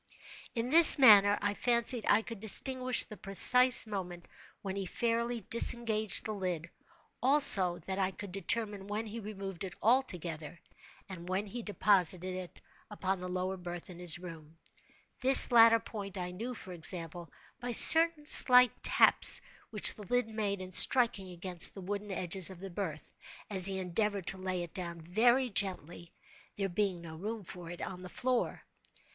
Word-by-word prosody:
In 235 Hz, +2 st, -5 dB
this 330 Hz, 0 st, +10 dB
manner 205 Hz, -6 st, +5 dB
I 205 Hz, 0 st, -2 dB
fancied 235 Hz, +1 st, -1 dB
I 215 Hz, +2 st, +2 dB
could 230 Hz, -2 st, -11 dB
distinguish 255 Hz, +4 st, +3 dB
the 215 Hz, -, -13 dB
precise 250 Hz, +6 st, +5 dB
moment 180 Hz, -5 st, -9 dB, 0.4 s
when 195 Hz, -1 st, -7 dB
he 195 Hz, -1 st, -6 dB
fairly 235 Hz, +3 st, -4 dB
disengaged 220 Hz, 0 st, -1 dB
the 220 Hz, -, -6 dB
lid—also, 185 Hz, -, -3 dB
that 190 Hz, 0 st, -6 dB
I 190 Hz, -1 st, -1 dB
could 195 Hz, 0 st, -11 dB
determine 205 Hz, +1 st, -4 dB
when 210 Hz, +2 st, -6 dB
he 220 Hz, +2 st, -9 dB
removed 195 Hz, -4 st, -9 dB
it 185 Hz, -2 st, -9 dB
altogether, 175 Hz, -, -3 dB, 0.5 s
and 180 Hz, -2 st, -11 dB
when 190 Hz, +3 st, -4 dB
he 235 Hz, +4 st, -9 dB
deposited 185 Hz, -3 st, -2 dB
it 185 Hz, -1 st, -11 dB, 0.3 s
upon 195 Hz, -2 st, -5 dB
the 180 Hz, 0 st, -8 dB
lower 185 Hz, +1 st, -5 dB
berth 175 Hz, 0 st, -10 dB
in 175 Hz, -, -14 dB
his 175 Hz, -2 st, 0 dB
room; 165 Hz, -3 st, -14 dB, 0.6 s
this 260 Hz, 0 st, +8 dB
latter 230 Hz, -1 st, +4 dB
point 200 Hz, -3 st, -10 dB
I 180 Hz, -1 st, -7 dB
knew, 230 Hz, +7 st, -8 dB
for 190 Hz, -, -13 dB
example, 170 Hz, -1 st, -3 dB, 0.3 s
by 245 Hz, +1 st, -7 dB
certain 320 Hz, +4 st, +5 dB
slight 250 Hz, -4 st, +5 dB
taps -, -, +1 dB, 0.3 s
which 210 Hz, -2 st, +6 dB
the -, -, -14 dB
lid 245 Hz, +2 st, -2 dB
made 210 Hz, -3 st, -5 dB
in 185 Hz, -, -12 dB
striking 210 Hz, -2 st, +4 dB
against 180 Hz, 0 st, -3 dB
the 195 Hz, -, -10 dB
wooden 205 Hz, +2 st, -7 dB
edges 185 Hz, 0 st, -1 dB
of 185 Hz, -2 st, -13 dB
the 195 Hz, 0 st, -11 dB
berth, 165 Hz, -5 st, -8 dB, 0.4 s
as 190 Hz, -2 st, +6 dB
he 195 Hz, -1 st, -5 dB
endeavored 195 Hz, +1 st, -4 dB
to 190 Hz, -, -1 dB
lay 185 Hz, -1 st, -5 dB
it 170 Hz, -, -12 dB
down 170 Hz, -3 st, -8 dB
very 240 Hz, +9 st, 0 dB
gently—there 190 Hz, +1 st, -7 dB
being 185 Hz, -1 st, -4 dB
no 160 Hz, -1 st, -12 dB
room 215 Hz, +4 st, -8 dB
for 175 Hz, -1 st, -12 dB
it 175 Hz, -, -11 dB
on 180 Hz, -1 st, -9 dB
the 180 Hz, -, -11 dB
floor. 250 Hz, +4 st, -4 dB
195 Hz, 165 wpm, -29 LUFS, 180-230 Hz, 0.6 s, this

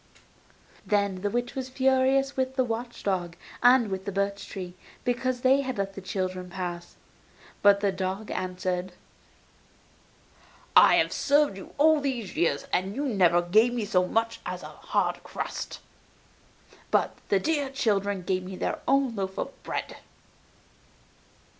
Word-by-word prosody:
Then 200 Hz, -3 st, 0 dB
the 205 Hz, -, 0 dB
witch 240 Hz, +3 st, -2 dB
was 260 Hz, -1 st, -4 dB
furious 265 Hz, +1 st, +2 dB
with 260 Hz, 0 st, -1 dB
the 260 Hz, -, +3 dB
watch 235 Hz, 0 st, -5 dB
dog 180 Hz, -3 st, -1 dB, 0.3 s
and 245 Hz, -4 st, +5 dB
with 190 Hz, 0 st, -4 dB
the 200 Hz, -, -3 dB
birch 200 Hz, +1 st, -2 dB
trees, 180 Hz, -2 st, -6 dB, 0.3 s
because 250 Hz, 0 st, -1 dB
they 265 Hz, +2 st, +4 dB
had 260 Hz, -2 st, -4 dB
let 195 Hz, 0 st, -2 dB
the 195 Hz, -, -8 dB
children 185 Hz, -1 st, -3 dB
pass. 175 Hz, -2 st, -5 dB, 0.7 s
But 200 Hz, 0 st, +6 dB
the 200 Hz, -1 st, +2 dB
dog 190 Hz, +2 st, -3 dB
answered: 185 Hz, 0 st, -3 dB, 1.8 s
'I -, -, +8 dB
have -, -, +2 dB
served 290 Hz, -6 st, +3 dB
you 190 Hz, -, -11 dB
all 310 Hz, +1 st, +5 dB
these 250 Hz, -8 st, -3 dB
years 160 Hz, -3 st, +1 dB
and 190 Hz, +2 st, 0 dB
you 285 Hz, +2 st, -1 dB
never 180 Hz, -8 st, +3 dB
gave 220 Hz, +7 st, +4 dB
me 230 Hz, -3 st, -1 dB
so 180 Hz, -2 st, +2 dB
much 225 Hz, +3 st, 0 dB
as -, -, -5 dB
a -, -, -7 dB
hard -, -, -1 dB
crust, -, -, -5 dB, 1.1 s
but -, -, +1 dB
the 200 Hz, -, +4 dB
dear 290 Hz, +3 st, 0 dB
children 205 Hz, -7 st, 0 dB
gave 185 Hz, +1 st, 0 dB
me 185 Hz, +1 st, -7 dB
their -, -, -2 dB
own 270 Hz, -3 st, +2 dB
loaf 190 Hz, -1 st, -3 dB
of -, -, -3 dB
bread. -, -, -4 dB
205 Hz, 150 wpm, -27 LUFS, 185-255 Hz, 1.8 s, I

